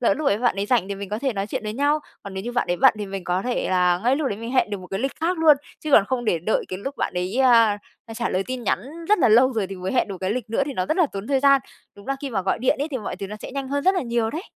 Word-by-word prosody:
Lỡ 245 +4 +3
lúc 300 0 -3
ấy 205 - +3
bạn 240 -4 +1
ấy 200 +1 -1
rảnh 220 -5 +1
thì 200 - -3
mình 200 0 -7
có 210 +2 -3
thể 265 +1 -1
nói 195 -2 -3
chuyện 215 - -4
với 210 - -3
nhau, 285 +5 +2 0.2
còn 200 -1 -8
nếu 190 +1 -5
như 240 - -4
bạn 245 - 0
ấy 175 - +1
bận 265 +6 +5
thì 205 - -4
mình 195 -1 -6
có 180 +1 0
thể 245 +2 -1
là 180 -1 +3
ngay 255 +3 +3
lúc 295 -2 -1
đấy 200 - -3
mình 230 +2 -6
hẹn 255 -5 +2
được 205 - -3
một 180 - -10
cái 195 +2 -4
lịch 270 +2 -1
khác 340 +2 0
luôn. 315 -2 +6 0.2
Chứ 310 - -5
còn 210 - +7
không 240 +3 -2
để 175 -6 +1
đợi 180 +7 0
cái 185 - -5
lúc 270 +7 -6
bạn - - -2
ấy, 180 +5 -2
a, 230 -5 +5 0.4
trả 235 +1 -2
lời 185 - 0
tin 255 -1 -4
nhắn 205 - +1 0.3
rất 420 - +4
là 310 - +4
lâu 250 +4 +5
rồi, 220 -5 -1
thì 195 +1 -7
mới 185 +1 -4
hẹn 245 - +1
được 195 -2 -6
cái 190 0 -1
lịch 225 -1 -3
nữa 230 - +1
thì 285 - -3
nó 185 -7 -2
rất - - 0
là 355 -4 +4
tốn 195 +1 -5
thời 270 0 +1
gian. 275 -1 +5 0.3
Đúng 200 - -15
là 275 - -1
khi 280 - -4
mà 200 -5 -1
gọi 190 - 0
điện 250 - +2
ấy 290 +3 -2
thì 260 - -2
mọi 210 - -5
thứ 195 - -5
nó 210 +2 -7
sẽ - - -7
nhanh 275 -1 -4
hơn 285 +1 -2
rất 380 - +4
là 365 - 0
nhiều 235 -2 -1
đấy. 320 +7 -5
230 Hz, 355 wpm, -23 LUFS, 195-270 Hz, 0.4 s, còn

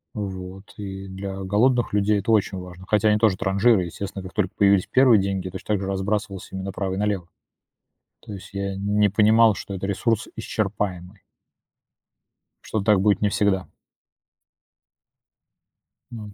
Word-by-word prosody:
Вот 95 -1 -7
и 95 -1 -7
для 95 0 -6
голодных 115 +5 +2
людей 105 +1 +2
это 100 +3 -1
очень 100 -3 +2
важно, 90 0 -10
хотя 105 0 +3
они 105 - +4
тоже 105 -4 +3
транжиры. 100 0 +3
Естественно, 95 +2 -6
как 95 - -10
только 100 -4 0
появились 100 -2 +4
первые 125 -6 +5
деньги, 95 -1 -2
точно 95 +3 -4
так 100 - -3
же 95 - -3
разбрасывался 100 0 -3
ими 95 - -4
направо 95 0 -3
и - - -5
налево. 100 -4 -1 0.9
То 105 - -10
есть 95 - -9
я 100 0 -3
н 100 +2 -2
не 105 -1 +5
понимал, 110 +2 +5
что 100 - -7
это 95 +1 -4
ресурс 105 +3 0
исчерпаемый. 100 -3 -3 1.4
Что 110 - -3
так 100 -1 +3
будет 100 0 +2
не 105 - +2
всегда. 100 -2 0 2.4
М, 105 -3 -8
100 Hz, 155 wpm, -23 LUFS, 95-105 Hz, 2.4 s, первые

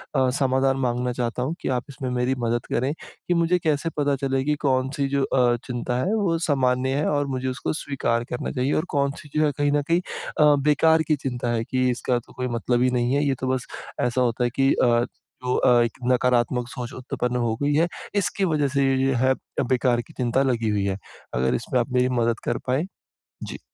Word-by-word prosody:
अ, 130 -1 +3
समाधान 135 0 +2
माँगना 125 -1 0
चाहता 120 0 -2
हूँ 155 +6 -2
कि - - -2
आप 125 - -4
इसमें 130 -1 -5
मेरी 125 +1 0
मदद 120 0 -1
करें 130 +5 +1 0.3
कि 180 - +2
मुझे 170 +1 +2
कैसे 155 +1 +1
पता 145 -1 +2
चले 135 0 -1
कि 150 +1 +1
कौन-सी 135 0 +1
जो 140 -1 +1
अ, 125 -2 +3
चिंता 125 0 -2
है, 185 +12 0
वो 180 -6 +1
सामान्य 130 -4 +1
है 150 - 0
और 145 -1 0
मुझे 130 -1 -3
उसको 130 +4 -2
स्वीकार 125 -6 -1
करना 125 - -3
चाहिए, 130 +2 0
और 155 - +1
कौन-सी 140 0 -1
जो 155 0 +4
है 145 - +2
कहीं 145 0 +2
न 145 0 +2
कहीं 170 +1 +4 0.4
अ, 150 -1 +6
बेकार 160 +2 +4
की 155 - +3
चिंता 125 -3 -3
है 115 -1 0
कि 130 +1 0
इसका 120 0 0
तो 120 - -18
कोई 125 0 -3
मतलब 120 +1 0
ही 130 - +4
नहीं 125 +1 +1
है। 145 - +2
ये 135 -2 +1
तो 130 - -2
बस 130 -1 -3 0.3
ऐसा 125 +1 +1
होता 120 0 +1
है - - +3
कि 135 0 +3
अ, - - +2 0.6
जो 125 - 0
अ, 120 -1 +4
एक 115 - -3
नकारात्मक 125 -1 +2
सोच 125 0 -6
उत्पन्न 125 -1 -3
हो 110 - 0
गई 145 0 +2
है, 165 +3 +3 0.3
इसकी 200 0 +1
वज़ह 150 -4 +1
से 140 -1 +2
ये-ये 135 0 +2
है 130 - +4 0.4
बेकार 125 -1 +2
की - - -17
चिंता 125 +1 +1
लगी 115 -4 0
हुई 100 -2 0
है। 95 -1 -1 0.4
अगर 65 +1 +1
इसमें 125 +2 -1
आप 120 - -1
मेरी 125 0 +3
मदद 115 0 +1
कर - - 0
पाएँ? 130 +7 +1 0.6
जी। - - -7
130 Hz, 220 wpm, -24 LUFS, 125-145 Hz, 0.6 s, अ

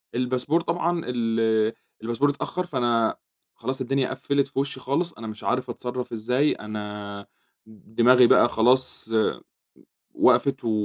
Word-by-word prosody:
الباسبور 125 +6 0
طبعًا 170 0 -1
ال 115 -2 +1 0.3
الباسبور 120 +5 +1
اتأخر، 180 +5 -3
فأنا 120 -7 0 0.4
خلاص 130 +3 -4
الدنيا 135 +1 0
قفّلت 140 -1 -1
في 135 - -4
وشي 140 -1 -3
خالص. 150 +7 -1
أنا 115 - -9
مش 110 -1 -8
عارف 125 0 -1
أتصرّف 125 +1 -5
إزاي، 125 +6 +1
أنا 105 -1 -7 0.4
د 110 0 -19
دماغي 125 +1 +6
بقى 120 - +5
خلاص 120 0 +2 1.0
وقفت 135 -1 +3
و - - +1
125 Hz, 135 wpm, -24 LUFS, 115-135 Hz, 1.0 s, دماغي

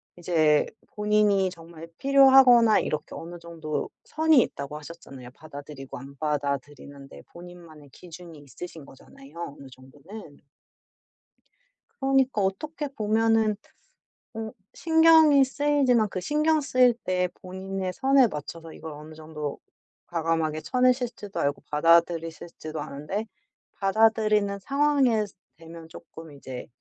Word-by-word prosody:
이제 160 -4 +2 0.3
본인이 210 -2 +2
정말 165 -2 -12
필요하거나 265 -5 +6
이렇게 155 - -4
어느 175 +1 -8
정도 165 -2 -5 0.2
선이 315 -3 +3
있다고 140 -6 -5
하셨잖아요. 140 -5 -11
받아들이고 140 -3 -10
안 135 +2 -12
받아들이는데 140 -1 -5
본인만의 170 -4 -13
기준이 170 +1 -12
있으신 145 +3 -10
거잖아요 135 +2 -16 0.2
어느 140 - -11
정도는. 145 +6 -13 1.6
그러니까 270 -4 +2
어떻게 295 +11 -3
보면은 220 -2 +1 0.8
어 220 -1 -6 0.2
신경이 320 -3 +5
쓰이지만 265 -5 +1
그 185 - -4
신경 305 - +1
쓰일 255 -3 +3
때 180 -1 0
본인의 190 0 -5
선에 270 0 +4
맞춰서 160 -1 -8
이걸 160 0 -9
어느 150 +2 -11
정도 155 -2 -7 0.5
과감하게 165 -2 -1
쳐내실 250 +1 +1
줄도 205 -1 -7
알고 140 0 -1
받아들이실 165 +1 +2
줄도 155 -1 -6
아는데 150 +10 -5 0.5
받아들이는 215 0 +2
상황에 275 -2 +1 0.3
되면 165 0 -12
조금 160 0 -13
이제 130 -3 -9
180 Hz, 300 characters per minute, -25 LUFS, 155-230 Hz, 1.6 s, 필요하거나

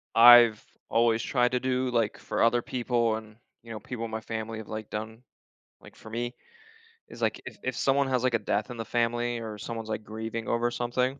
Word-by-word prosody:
I've 120 -2 +8 0.3
always 115 0 +3
tried 125 -2 +2
to 125 - +2
do, 130 0 0
like, 115 -3 0
for - - -3
other 120 +1 +3
people 120 -2 0
and, 110 -1 -9 0.3
you 115 - -11
know, 110 - -5
people 115 +2 -5
in 115 - -7
my 110 0 -3
family 110 0 -5
have, 110 - -9
like, 110 -1 -6
done, 110 +2 -6 0.6
like, - - -15
for 110 - -13
me 120 +2 -4 0.7
is, - - -11
like, - - 0
if - - -9
if 130 - -2
someone 140 0 +2
has, 125 -1 +1
like, 130 -1 +2
a - - +1
death 105 +2 -1
in 120 - -7
the 115 - -4
family 120 +1 0
or 110 -2 -6
someone's, 115 +1 -6
like, 110 0 -3
grieving 110 +1 -5
over 120 +1 +1
something, 125 +3 -1
115 Hz, 215 wpm, -28 LUFS, 110-120 Hz, 0.7 s, I've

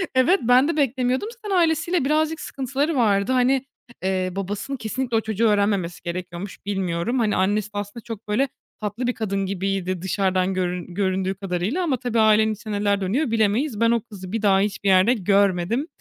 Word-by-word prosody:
Evet, 305 +10 +4
ben 250 +4 +5
de 330 - -1
beklemiyordum. 260 - +1
Zaten 425 -5 -4
ailesiyle 330 -2 +2
birazcık 310 +2 +1
sıkıntıları 275 +4 -2
vardı. 210 -2 +2
Hani, 260 +1 +2 0.4
eee, 185 -1 0
babasının 205 +8 -4
kesinlikle 235 +1 -2
o 225 - +2
çocuğu 220 +1 0
öğrenmemesi 200 -4 0
gerekiyormuş, 175 +2 -6
bilmiyorum. 195 +3 -1
Hani, 215 -3 +1
annesi 205 +2 +1
de - - -5
aslında 205 +3 -6
çok, 225 -2 -8
böyle, 235 +7 +1 0.3
tatlı 215 +4 -3
bir 250 - +1
kadın 200 -4 -2
gibiydi 190 -1 -2
dışarıdan 190 0 0
görün 180 -1 -3
göründüğü 190 -1 0
kadarıyla 195 - -2
ama 290 -7 0
tabii 240 -2 -1
ailenin 220 0 +4
içinde 210 -1 -5
neler 200 -1 +1
dönüyor 230 +8 0
bilemeyiz. 225 +3 +1
Ben 230 0 +4
o 235 - +2
kızı 195 -5 -10
bir 225 0 -2
daha 195 -2 +4
hiçbir 200 0 -1
yerde 190 +5 +5
görmedim. 200 - +1
210 Hz, 175 wpm, -23 LUFS, 190-255 Hz, 0.4 s, ben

